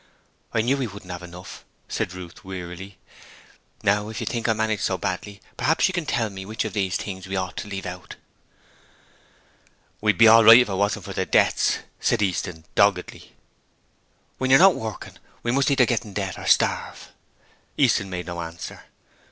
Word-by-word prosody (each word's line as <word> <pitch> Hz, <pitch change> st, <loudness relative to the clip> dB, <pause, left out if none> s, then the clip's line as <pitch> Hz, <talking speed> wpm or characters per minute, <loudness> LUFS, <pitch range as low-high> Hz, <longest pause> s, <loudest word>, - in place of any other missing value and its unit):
'I 110 Hz, -, +2 dB
knew 130 Hz, +5 st, +1 dB
we 130 Hz, -3 st, -2 dB
wouldn't 100 Hz, -3 st, -10 dB
have 90 Hz, -1 st, -6 dB
enough,' 90 Hz, +1 st, -11 dB, 0.2 s
said 90 Hz, -, -3 dB
Ruth, 90 Hz, -2 st, -10 dB
wearily. 95 Hz, 0 st, -8 dB, 0.9 s
'Now 105 Hz, +1 st, +1 dB
if 110 Hz, -, -6 dB
you -, -, -3 dB
think 120 Hz, -1 st, -2 dB
I -, -, +4 dB
manage 110 Hz, -1 st, -1 dB
so 95 Hz, -, -1 dB
badly, 100 Hz, +2 st, -4 dB, 0.2 s
p'raps 160 Hz, -, +2 dB
you 185 Hz, -, -3 dB
can 175 Hz, -4 st, -3 dB
tell 110 Hz, -3 st, 0 dB
me 95 Hz, -1 st, -7 dB
which 110 Hz, +3 st, -4 dB
of -, -, -4 dB
these 95 Hz, -4 st, 0 dB
things 95 Hz, -2 st, -7 dB
we 95 Hz, -, -4 dB
ought 95 Hz, -1 st, -3 dB
to -, -, -5 dB
leave 100 Hz, -1 st, -6 dB
out.' 90 Hz, 0 st, -8 dB, 1.9 s
'We'd 105 Hz, -3 st, +2 dB
be 115 Hz, -, +7 dB
all 115 Hz, +1 st, +8 dB
right 115 Hz, +2 st, +10 dB
if 125 Hz, -3 st, +3 dB
it -, -, -2 dB
wasn't 100 Hz, +2 st, -1 dB
for -, -, -6 dB
the -, -, -2 dB
debts,' -, -, +2 dB, 0.2 s
said -, -, +1 dB
Easton, 90 Hz, -3 st, -3 dB
doggedly. 100 Hz, -3 st, +1 dB, 1.1 s
'When 130 Hz, -, -1 dB
you're 135 Hz, -, +8 dB
not 190 Hz, +3 st, +7 dB
working, 110 Hz, -6 st, -7 dB, 0.2 s
we 120 Hz, -, 0 dB
must 135 Hz, +3 st, +2 dB
either 135 Hz, -3 st, +4 dB
get 120 Hz, 0 st, 0 dB
into 105 Hz, -2 st, -6 dB
debt 95 Hz, -2 st, -4 dB
or -, -, -7 dB
starve.' -, -, +1 dB, 0.7 s
Easton 100 Hz, -, +2 dB
made 90 Hz, -1 st, -5 dB
no 85 Hz, -1 st, -5 dB
answer. 85 Hz, 0 st, -8 dB
100 Hz, 185 wpm, -24 LUFS, 90-115 Hz, 1.9 s, right